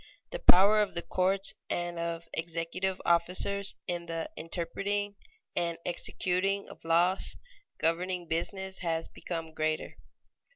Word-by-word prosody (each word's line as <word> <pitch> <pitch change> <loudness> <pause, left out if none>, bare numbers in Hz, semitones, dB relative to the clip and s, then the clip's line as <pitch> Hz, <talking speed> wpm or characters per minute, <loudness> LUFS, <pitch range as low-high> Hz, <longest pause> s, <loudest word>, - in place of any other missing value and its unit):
_The - - -5
power 200 +4 +7
of 205 - -1
the 170 - -2
courts 190 +1 +2 0.2
and 175 -1 -2
of 170 0 -2
executive 170 +3 -2
officers 185 +4 +2
in 175 -1 -3
the 165 -1 -3
interpreting 195 +5 -2 0.4
and 170 -1 0
executing 185 +2 0
of - - -13
laws 175 +3 +3 0.4
governing 175 +2 0
business 190 +4 -2
has 165 -2 -1
become 165 -2 -5
greater. 155 0 -1
175 Hz, 120 wpm, -31 LUFS, 165-190 Hz, 0.4 s, power